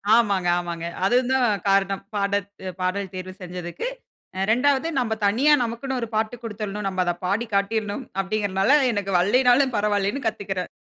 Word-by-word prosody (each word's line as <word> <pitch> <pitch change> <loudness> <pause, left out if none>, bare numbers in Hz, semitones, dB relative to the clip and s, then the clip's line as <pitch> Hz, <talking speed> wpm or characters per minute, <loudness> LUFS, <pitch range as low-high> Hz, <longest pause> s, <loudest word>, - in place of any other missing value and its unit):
ஆமாங்க, 200 -6 +2
ஆமாங்க. 170 -1 -5 0.2
அதுவும் 250 +4 +2
தான் 240 -6 +2
காரணம் 195 0 +2
பாடத் 200 -1 0 0.3
பாடல் 190 +1 -1
தேர்வு 185 0 -6
செஞ்சதுக்கு, 180 - -5 0.5
அ - - -1
2வது 275 +5 +2
நம்ம 225 -3 0
தனியா 260 +9 +4
நமக்குன்னு 240 +3 -3
ஒரு 230 - -2
பாட்டு 220 +2 0
குடுத்துரனும். 210 -2 -5
நம்ம 185 -1 -1
அதை 175 -1 0
பாடி 205 +6 0
காட்டிறணும், 205 +4 0 0.2
அப்படீன்ங்கறதனால 200 +5 +2
எனக்கு 200 -3 -2
வல்லைனாலும் 250 +6 +4
பரவாயில்லன்னு 205 +5 0
கத்துக்குக்கிறேன். 195 -4 -3
205 Hz, 145 wpm, -24 LUFS, 195-235 Hz, 0.5 s, தனியா